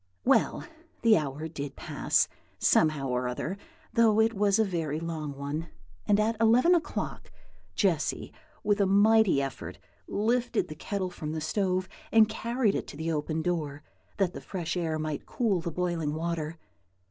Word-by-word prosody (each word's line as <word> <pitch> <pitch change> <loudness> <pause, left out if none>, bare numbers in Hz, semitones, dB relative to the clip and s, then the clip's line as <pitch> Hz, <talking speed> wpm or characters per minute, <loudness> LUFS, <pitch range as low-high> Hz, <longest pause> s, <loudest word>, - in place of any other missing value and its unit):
Well, - - +3 0.4
the 230 -2 +7
hour 150 -1 -2
did 145 -3 -6
pass, - - +1 0.3
somehow 155 -3 +3
or 125 0 0
other, 135 +9 -3 0.4
though 225 -2 +4
it 225 +1 +4
was 200 -1 +2
a 220 - +3
very 160 -5 -2
long 155 -4 -4
one; 145 +4 -4 0.4
and 205 0 +4
at 220 +2 +2
eleven 240 +10 +5
o'clock, 340 -3 -2 0.5
Jessy, - - 0 0.3
with 205 -1 +2
a 195 - +3
mighty 205 -6 +5
effort, 135 - -6 0.3
lifted 235 +4 0
the - - -5
kettle 185 +3 -3
from 155 -3 -5
the 160 - -2
stove 185 +3 0 0.2
and 220 -1 +6
carried 230 0 0
it - - -3
to - - -9
the 160 +2 -2
open 155 +1 -2
door, 150 -5 -2 0.3
that 190 -3 +1
the - - -7
fresh 175 -3 -4
air 165 -3 -1
might 155 -1 -4
cool 210 -8 0
the 170 - -3
boiling 165 -3 -1
water. 165 -1 -3
175 Hz, 160 wpm, -28 LUFS, 155-210 Hz, 0.5 s, the